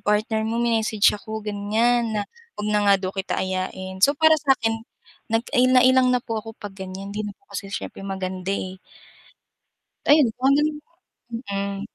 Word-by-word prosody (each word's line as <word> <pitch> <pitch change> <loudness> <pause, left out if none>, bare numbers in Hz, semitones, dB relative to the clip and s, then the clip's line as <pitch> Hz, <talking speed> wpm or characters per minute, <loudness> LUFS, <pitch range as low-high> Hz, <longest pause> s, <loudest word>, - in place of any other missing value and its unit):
partner 215 +1 +1
mo 230 - -1
may-message 220 -3 0
ako 220 +1 -6
ganyan 220 +3 +1
na 205 - 0 0.3
huwag 210 0 -3
na 210 - +3
nga 200 - +7
daw 185 -1 -2
kita 195 - -2
ayain 190 0 -4
so 285 - +4
para 315 +1 +5
sakin, 230 -6 +1 0.5
nai 245 +3 +2
na 255 -1 +6
ilang 260 0 +5
na 250 - +2
po 225 -2 -2
ako 225 +1 -11
pag 205 -1 -8
ganyan 190 +1 -7
hindi 215 +1 -3
na - - -7
po 265 - -38
kasi 195 0 -5
siyempre - - -5
maganda 190 -1 -4
eh. 185 -1 -4 1.3
Ayon 295 -4 +6
kung 260 +2 +1
ano 280 +2 +5 0.9
mm. 200 0 -2
215 Hz, 170 wpm, -23 LUFS, 195-240 Hz, 1.3 s, nga